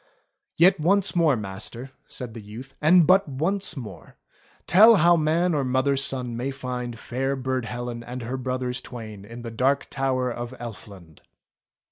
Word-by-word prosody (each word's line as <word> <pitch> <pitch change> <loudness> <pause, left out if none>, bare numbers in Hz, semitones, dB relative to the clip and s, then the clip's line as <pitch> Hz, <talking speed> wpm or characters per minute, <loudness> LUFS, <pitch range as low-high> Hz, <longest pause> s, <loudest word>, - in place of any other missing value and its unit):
"Yet 175 +1 +5
once 195 +5 +2
more, 165 -5 +4
Master," 110 +6 -7 0.2
said 125 -3 -7
the 115 - -8
youth, 115 +6 -10
"and 170 +2 +6
but 190 +2 +4
once 175 +5 -2
more, 110 -7 -9 0.5
tell 220 +5 +7
how 175 -1 +5
man 165 +2 +1
or 145 -2 +1
mother's 130 +2 +1
son 125 -4 -3
may 125 +3 -2
find 125 -3 -5
fair 135 +4 -2
Burd 130 -2 -2
Helen 120 +1 -5
and 125 +1 -7
her 120 +3 -4
brothers 125 -1 -3
twain 110 -5 -9
in 115 +3 -10
the 115 - -6
Dark 135 +5 0
Tower 130 -2 0
of 120 +1 -6
Elfland." 100 -8 -10
130 Hz, 160 wpm, -25 LUFS, 120-150 Hz, 0.5 s, tell